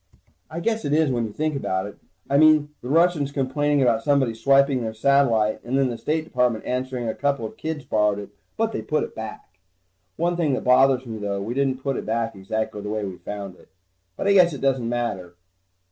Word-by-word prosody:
I 165 Hz, +2 st, -5 dB
guess 225 Hz, +4 st, -1 dB
it 145 Hz, -, -1 dB
is 155 Hz, -2 st, +3 dB
when 120 Hz, -2 st, 0 dB
you -, -, -9 dB
think 155 Hz, +6 st, -2 dB
about 95 Hz, -8 st, -2 dB
it. 100 Hz, -, -9 dB, 0.3 s
I 140 Hz, -, +3 dB
mean, 155 Hz, -1 st, +5 dB
the 125 Hz, -, -7 dB
Russians 165 Hz, -2 st, +2 dB
complaining 145 Hz, +1 st, +1 dB
about 115 Hz, -3 st, +2 dB
somebody 135 Hz, -2 st, +2 dB
swiping 135 Hz, +2 st, +3 dB
their 110 Hz, -1 st, -4 dB
satellite 115 Hz, -4 st, +2 dB
and 130 Hz, +3 st, -1 dB
then 135 Hz, -2 st, +2 dB
the 120 Hz, -, -5 dB
State 155 Hz, +1 st, -1 dB
Department 125 Hz, -7 st, 0 dB
answering 125 Hz, -1 st, -3 dB
a 110 Hz, -, -1 dB
couple 140 Hz, -5 st, -1 dB
of 110 Hz, -, -7 dB
kids 155 Hz, -3 st, -5 dB
borrowed 105 Hz, -1 st, +1 dB
it, 100 Hz, -1 st, -7 dB, 0.3 s
but 225 Hz, 0 st, 0 dB
they -, -, -3 dB
put 155 Hz, -, -1 dB
it -, -, -7 dB
back. 110 Hz, -1 st, -8 dB, 0.7 s
One 175 Hz, +1 st, 0 dB
thing 160 Hz, -5 st, +1 dB
that -, -, -4 dB
bothers 130 Hz, +1 st, +4 dB
me 110 Hz, -2 st, -6 dB
though, 100 Hz, -1 st, -2 dB
we 105 Hz, +4 st, -4 dB
didn't 130 Hz, -1 st, -1 dB
put 135 Hz, -2 st, -1 dB
it -, -, -5 dB
back 115 Hz, +1 st, -1 dB
exactly 105 Hz, +2 st, -4 dB
the 105 Hz, -, -6 dB
way 105 Hz, -1 st, -2 dB
we 95 Hz, -2 st, -6 dB
found 100 Hz, -3 st, -7 dB
it. -, -, -21 dB, 0.5 s
But -, -, -2 dB
I 200 Hz, -, +5 dB
guess 180 Hz, -4 st, +5 dB
it 140 Hz, -, -7 dB
doesn't 130 Hz, -4 st, +1 dB
matter. 100 Hz, -8 st, -3 dB
130 Hz, 220 wpm, -23 LUFS, 110-145 Hz, 0.7 s, mean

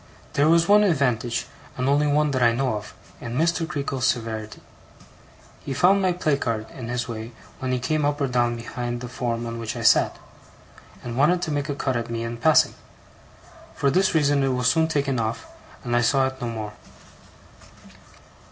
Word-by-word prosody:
There 145 Hz, +2 st, +3 dB
was 170 Hz, +1 st, +4 dB
one 210 Hz, +1 st, +6 dB
advantage, 125 Hz, -, +1 dB, 0.3 s
and 130 Hz, +1 st, -1 dB
only 145 Hz, +2 st, +3 dB
one 150 Hz, 0 st, +2 dB
that 130 Hz, -2 st, -1 dB
I 120 Hz, -1 st, +5 dB
know 125 Hz, 0 st, 0 dB
of, 105 Hz, 0 st, -7 dB, 0.2 s
in 120 Hz, 0 st, -5 dB
Mr. 165 Hz, +1 st, +1 dB
Creakle's 140 Hz, -4 st, -2 dB
severity. 110 Hz, -4 st, -3 dB, 1.0 s
He 135 Hz, -, -4 dB
found 195 Hz, +7 st, +4 dB
my 185 Hz, -1 st, +2 dB
placard 140 Hz, -10 st, -1 dB
in 120 Hz, -3 st, -8 dB
his 120 Hz, 0 st, -2 dB
way 115 Hz, 0 st, -6 dB, 0.3 s
when 130 Hz, -1 st, -2 dB
he 130 Hz, -, +1 dB
came 150 Hz, +5 st, -1 dB
up 145 Hz, 0 st, 0 dB
or 140 Hz, -, +1 dB
down 120 Hz, -2 st, +1 dB
behind 120 Hz, +1 st, -5 dB
the 125 Hz, -, -5 dB
form 120 Hz, -1 st, -3 dB
on 115 Hz, 0 st, -5 dB
which 115 Hz, -2 st, -4 dB
I -, -, -5 dB
sat, -, -, +4 dB, 0.9 s
and 120 Hz, -1 st, -5 dB
wanted 175 Hz, +6 st, +3 dB
to 160 Hz, -, -2 dB
make 145 Hz, 0 st, -2 dB
a 145 Hz, -, -1 dB
cut 135 Hz, -2 st, -1 dB
at 115 Hz, 0 st, -3 dB
me 115 Hz, 0 st, -3 dB
in 115 Hz, 0 st, -4 dB
passing; 155 Hz, +6 st, +4 dB, 1.0 s
for 140 Hz, -, +1 dB
this 190 Hz, +2 st, +2 dB
reason 145 Hz, -2 st, +3 dB
it 135 Hz, -, +2 dB
was 125 Hz, 0 st, +2 dB
soon 160 Hz, -1 st, +2 dB
taken 140 Hz, -5 st, 0 dB
off, 110 Hz, 0 st, -3 dB, 0.4 s
and 120 Hz, 0 st, -1 dB
I 120 Hz, -, +3 dB
saw 135 Hz, +3 st, +3 dB
it 130 Hz, 0 st, -5 dB
no 120 Hz, -, -2 dB
more. 110 Hz, -2 st, -5 dB
130 Hz, 190 wpm, -24 LUFS, 120-145 Hz, 1.0 s, one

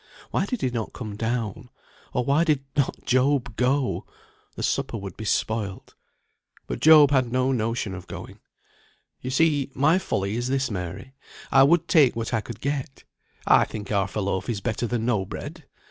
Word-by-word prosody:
Why -, -, 0 dB
did 250 Hz, -6 st, -3 dB
he 130 Hz, -, +1 dB
not 115 Hz, -3 st, -4 dB
come 110 Hz, -4 st, -6 dB
down? 115 Hz, +1 st, -3 dB, 0.4 s
Or 125 Hz, -, -1 dB
why 140 Hz, +5 st, +3 dB
did 150 Hz, -5 st, +1 dB
not 140 Hz, -3 st, -1 dB
Job 130 Hz, -2 st, +2 dB
go? 130 Hz, +2 st, 0 dB, 0.5 s
The -, -, -5 dB
supper -, -, -1 dB
would 100 Hz, -2 st, -7 dB
be 110 Hz, -, -7 dB
spoilt. 105 Hz, -2 st, -2 dB, 0.7 s
But -, -, -4 dB
Job 150 Hz, -2 st, +7 dB
had 130 Hz, -4 st, +2 dB
no 130 Hz, +1 st, +1 dB
notion 115 Hz, -4 st, -1 dB
of 95 Hz, -1 st, -8 dB
going. -, -, -9 dB, 0.8 s
"You 130 Hz, -, -4 dB
see 145 Hz, 0 st, +2 dB
my 155 Hz, +7 st, +4 dB
folly 100 Hz, -, -2 dB
is 120 Hz, +1 st, -2 dB
this, 135 Hz, -1 st, 0 dB
Mary. 90 Hz, +7 st, -6 dB, 0.4 s
I 135 Hz, -, +6 dB
would 155 Hz, +4 st, +4 dB
take 145 Hz, -7 st, +5 dB
what 115 Hz, +1 st, -3 dB
I 110 Hz, -, +1 dB
could 110 Hz, 0 st, -9 dB
get; 140 Hz, -1 st, -3 dB, 0.4 s
I -, -, +6 dB
think 105 Hz, -2 st, -6 dB
half 100 Hz, -2 st, 0 dB
a 105 Hz, -, 0 dB
loaf 95 Hz, +2 st, -2 dB
is 110 Hz, -4 st, -1 dB
better 115 Hz, +2 st, -2 dB
than 115 Hz, -1 st, -2 dB
no 110 Hz, -6 st, +1 dB
bread. 140 Hz, -, -8 dB
125 Hz, 180 wpm, -25 LUFS, 110-140 Hz, 0.8 s, Job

